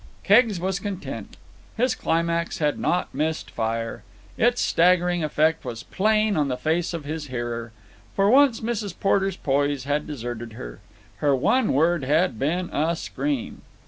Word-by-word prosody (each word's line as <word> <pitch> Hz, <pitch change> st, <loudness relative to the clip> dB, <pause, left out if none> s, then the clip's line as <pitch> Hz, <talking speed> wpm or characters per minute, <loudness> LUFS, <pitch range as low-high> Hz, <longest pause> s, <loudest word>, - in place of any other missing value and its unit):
Keggs 210 Hz, -2 st, +4 dB
was 190 Hz, +2 st, -1 dB
content. 200 Hz, -3 st, -6 dB, 0.4 s
His 250 Hz, +3 st, +2 dB
climax 170 Hz, +1 st, -1 dB
had 150 Hz, -2 st, 0 dB
not 180 Hz, -, 0 dB
missed 155 Hz, +3 st, -2 dB
fire. 115 Hz, 0 st, -3 dB, 0.3 s
Its 240 Hz, +2 st, +2 dB
staggering 175 Hz, 0 st, +3 dB
effect 155 Hz, +1 st, +1 dB
was 120 Hz, -2 st, -6 dB
plain 215 Hz, +1 st, +1 dB
on 150 Hz, -3 st, +1 dB
the 125 Hz, -2 st, -2 dB
face 160 Hz, +5 st, 0 dB
of 160 Hz, -3 st, -6 dB
his 155 Hz, 0 st, -4 dB
hearer. 120 Hz, -2 st, -4 dB, 0.4 s
For 195 Hz, 0 st, +3 dB
once 260 Hz, +1 st, +5 dB
Mrs. 220 Hz, -5 st, -3 dB
Porter's 195 Hz, -1 st, +1 dB
poise 140 Hz, -1 st, 0 dB
had 145 Hz, +2 st, -1 dB
deserted 120 Hz, -5 st, -6 dB
her. -, -, -9 dB, 0.4 s
Her 140 Hz, +4 st, +2 dB
one 255 Hz, -, +2 dB
word 165 Hz, +2 st, +2 dB
had 150 Hz, -3 st, +1 dB
been 170 Hz, +6 st, -1 dB
a 160 Hz, +3 st, +1 dB
scream. 260 Hz, -, -3 dB
165 Hz, 150 wpm, -24 LUFS, 140-195 Hz, 0.4 s, once